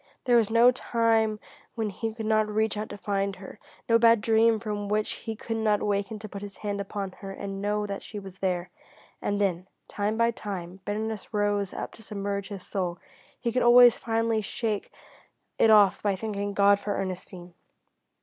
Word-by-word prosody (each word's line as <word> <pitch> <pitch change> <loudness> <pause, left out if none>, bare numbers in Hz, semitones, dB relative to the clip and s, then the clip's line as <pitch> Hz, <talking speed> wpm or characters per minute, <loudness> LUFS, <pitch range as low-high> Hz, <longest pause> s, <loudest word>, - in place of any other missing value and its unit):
There 245 -2 +4
was 225 -3 +3
no 230 +2 +6
time 225 -3 +1 0.4
when 220 -3 -2
he 225 +3 -3
could 220 0 -6
not 215 0 +2
reach 220 +1 0
out 210 +1 -4
to 205 - -7
find 200 -1 -1
her, 190 +1 -11 0.3
no 230 0 +5
bad 230 -1 +6
dream 225 +1 +3
from 205 -2 -4
which 215 0 +1
he 225 -1 -5
could 225 +1 -4
not 215 -2 +2
awaken 205 +1 -1
to 215 +1 -8
put 200 -1 -8
his 200 -1 -8
hand 205 -1 -3
upon 195 -1 -4
her 195 - -7
and 195 0 -6
know 210 +1 0
that 200 -1 -5
she 215 - -8
was 195 -2 -9
there. 180 -2 -1 0.5
And 205 0 -1
when, 185 -2 0 0.2
time 210 +2 -2
after 230 0 +4
time, 190 -5 -6
bitterness 215 0 -4
rose 205 -2 +1
up - - -6
to - - -13
submerge 200 -2 -4
his 200 -3 -7
soul, 180 -3 -2 0.4
he 235 - -1
could 250 +2 +1
always 240 0 +8
finally 225 -1 0
shake 215 0 -3 0.7
it 225 - +5
off 205 -3 +6
by 200 -2 +1
thanking 205 0 -4
God 200 0 +5
for 205 0 -3
Ernestine. 180 -1 -6
210 Hz, 190 wpm, -27 LUFS, 200-220 Hz, 0.7 s, always